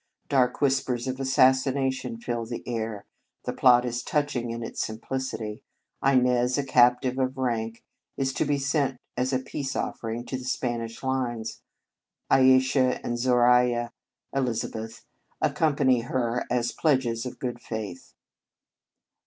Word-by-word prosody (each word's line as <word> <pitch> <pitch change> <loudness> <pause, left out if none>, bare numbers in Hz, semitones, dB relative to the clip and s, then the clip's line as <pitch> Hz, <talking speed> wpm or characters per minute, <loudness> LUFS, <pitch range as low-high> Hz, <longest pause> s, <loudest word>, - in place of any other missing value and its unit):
Dark 125 -1 +2
whispers 130 -3 +1
of 130 0 -3
assassination 130 -1 +2
fill 120 0 -3
the 120 0 -6
air. 110 -3 -3 0.4
The - - -2
plot 125 -1 +5
is 120 0 -2
touching 145 -5 -1
in 115 0 -4
its - - -3
simplicity. 110 -1 -4 0.4
Inez, 125 -1 +3
a 145 - +1
captive 125 0 +3
of 130 0 -1
rank, 115 -3 -2 0.3
is 135 -1 0
to - - 0
be 145 -1 +1
sent 140 -1 0 0.2
as 125 +2 0
a 130 - +2
peace 135 +1 -4
offering 115 +1 -3
to 130 +2 -4
the - - -8
Spanish 120 -2 -3
lines. 120 -4 -2 0.7
Ayesha 130 0 +4
and 120 - -1
Zoraiya 125 -1 +3 0.4
(Elizabeth) 115 -3 -3 0.3
accompany 140 -5 +2
her 120 0 -1
as 120 0 0
pledges 130 -6 +1
of 125 - -8
good 120 -2 -4
faith. 105 -7 -7
125 Hz, 130 wpm, -26 LUFS, 120-130 Hz, 0.7 s, plot